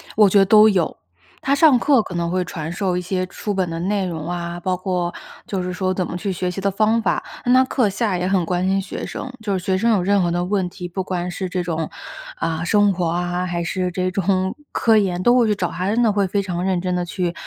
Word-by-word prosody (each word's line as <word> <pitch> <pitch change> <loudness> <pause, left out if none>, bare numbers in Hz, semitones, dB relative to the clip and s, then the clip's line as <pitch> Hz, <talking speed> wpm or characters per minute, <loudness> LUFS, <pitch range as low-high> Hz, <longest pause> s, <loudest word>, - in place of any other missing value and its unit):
我 210 -2 +6
觉 200 - +5
得 195 - +5
都 215 +2 +7
有。 185 -5 0 0.5
她 275 +1 +2
上 285 -3 +5
课 265 -3 +3
可 185 - -8
能 170 -1 -1
会 180 +1 0
传 160 -2 -5
授 180 0 -1
一 180 - -1
些 185 +1 -2
书 210 - -4
本 190 -2 0
的 165 0 -4
内 195 +1 0
容 165 -2 -5
啊， 175 0 -4
包 185 +1 -1
括 180 -1 -2 0.4
就 195 -2 -2
是 180 0 -3
说 185 0 -1
怎 185 -1 -1
么 170 - -6
去 195 +2 -2
学 180 0 -2
习 195 - -5
的 200 - +1
方 220 +3 +2
法， - - 0 0.2
那 245 - +4
她 260 0 +5
课 250 -4 +1
下 205 0 -1
也 180 +1 -1
很 190 -3 +1
关 180 +2 0
心 195 +1 +2
学 190 -1 -6
生， 260 - -6
就 200 -3 -1
是 180 - -7
学 190 - +1
生 230 +4 +2
有 195 -4 +1
任 200 +1 +3
何 175 - +1
的 175 +1 -1
问 190 -1 0
题， 180 0 -7
不 185 +2 -4
管 180 -1 -3
是 185 +2 -4
这 180 0 -2
种 165 -2 -3 0.5
啊 165 - -2
生 205 +3 +3
活 180 -2 -1
啊， 175 +2 -1
还 170 -1 -2
是 180 +2 -1
这 185 +1 -1
种 190 0 0 0.2
科 225 -2 +3
研 185 -4 +1
都 240 +4 +5
会 240 -3 +4
去 210 - +2
找 185 -3 -2
她， 185 +1 -3
真 230 +3 +2
的 225 - +4
会 200 -1 +1
非 200 +2 0
常 180 -2 -3
认 185 -1 +1
真 180 +1 -2
地 180 - 0
去 175 -1 -2
185 Hz, 285 characters per minute, -21 LUFS, 175-205 Hz, 0.5 s, 都